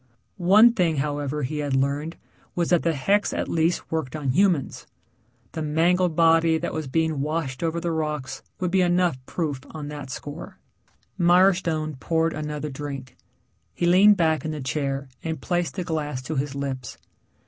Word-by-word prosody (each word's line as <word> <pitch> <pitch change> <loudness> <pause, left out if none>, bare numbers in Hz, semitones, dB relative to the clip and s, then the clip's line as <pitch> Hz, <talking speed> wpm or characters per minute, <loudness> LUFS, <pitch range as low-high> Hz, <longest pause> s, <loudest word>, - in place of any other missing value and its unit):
One 210 +7 +6
thing, 175 -7 +1
however, 145 0 -2
he 150 +4 -3
had 145 -2 -1
learned 140 +4 -1 0.4
was 170 -2 0
that 175 - +4
the 165 -2 0
hex 200 +9 +1
at - - -2
least 165 +1 0
worked 160 -4 -2
on 140 -4 -1
humans. 175 -2 +1 0.6
The 160 - -5
mangled 165 +3 +2
body 165 0 +4
that - - -4
was 155 -2 -3
being 160 0 0
washed 150 -3 -2
over 165 0 -1
the 170 0 -2
rocks 150 -5 -3 0.2
would 180 -2 -1
be 190 0 +3
enough 175 -6 +1
proof 150 -6 -2
on 150 -2 -7
that 145 -3 -7
score. 145 +4 -8 0.6
Mirestone 175 -4 +3
poured 165 +2 0
another 150 -1 -4
drink. 135 -2 -7 0.6
He 175 - -1
leaned 195 +4 +6
back 160 -3 +2
in 155 - -3
the 155 -1 -4
chair 135 +1 -2 0.2
and 160 -2 -3
placed 175 +3 -1
the 185 - -2
glass 150 -6 -3
to 155 +4 -4
his 140 0 -2
lips. 135 -4 -5
155 Hz, 170 wpm, -24 LUFS, 145-170 Hz, 0.6 s, One